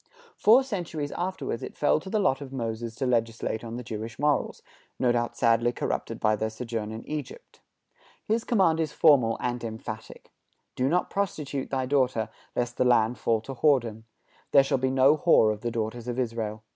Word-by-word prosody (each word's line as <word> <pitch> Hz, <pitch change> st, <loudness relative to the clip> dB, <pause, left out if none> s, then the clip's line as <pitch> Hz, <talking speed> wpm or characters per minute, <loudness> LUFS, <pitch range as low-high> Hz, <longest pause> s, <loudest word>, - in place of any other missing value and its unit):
Four 235 Hz, +6 st, +5 dB
centuries 170 Hz, -, -4 dB
afterward 175 Hz, -10 st, -3 dB
it -, -, -8 dB
fell 150 Hz, -, +3 dB
to 190 Hz, -, -9 dB
the 215 Hz, -, 0 dB
lot 145 Hz, -10 st, +1 dB
of 135 Hz, -2 st, -8 dB
Moses 115 Hz, -2 st, -4 dB
to 135 Hz, -, -2 dB
legislate 115 Hz, -2 st, -1 dB
on 115 Hz, 0 st, -6 dB
the 125 Hz, -, -6 dB
Jewish 110 Hz, 0 st, -6 dB
morals, 145 Hz, 0 st, 0 dB, 0.3 s
no 125 Hz, -2 st, +2 dB
doubt 120 Hz, 0 st, -1 dB
sadly 115 Hz, 0 st, +3 dB
corrupted -, -, -3 dB
by 110 Hz, 0 st, +2 dB
their 110 Hz, +1 st, -2 dB
sojourn 110 Hz, -1 st, -5 dB
in 110 Hz, +1 st, -8 dB
Egypt. 155 Hz, -, -7 dB, 0.6 s
His 225 Hz, +2 st, 0 dB
command 185 Hz, -8 st, +2 dB
is 155 Hz, -3 st, -1 dB
formal 125 Hz, -8 st, +4 dB
and 120 Hz, -1 st, -3 dB
emphatic: 110 Hz, 0 st, -7 dB, 0.4 s
"Do 130 Hz, +1 st, +1 dB
not 180 Hz, +3 st, 0 dB
prostitute 150 Hz, -9 st, -3 dB
thy 130 Hz, -1 st, -1 dB
daughter, 130 Hz, -5 st, +1 dB, 0.3 s
lest 120 Hz, 0 st, -2 dB
the -, -, +3 dB
land 120 Hz, -1 st, +3 dB
fall 115 Hz, -1 st, +1 dB
to 135 Hz, +4 st, -7 dB
whoredom.... 120 Hz, -6 st, +1 dB, 0.5 s
There 140 Hz, -, +8 dB
shall 135 Hz, -1 st, 0 dB
be 130 Hz, +1 st, +1 dB
no 135 Hz, +3 st, +4 dB
whore 115 Hz, -10 st, +4 dB
of 105 Hz, -, -10 dB
the 120 Hz, -, -2 dB
daughters 115 Hz, +1 st, -4 dB
of 120 Hz, 0 st, -3 dB
Israel." 110 Hz, -3 st, -3 dB
125 Hz, 185 wpm, -27 LUFS, 115-145 Hz, 0.6 s, There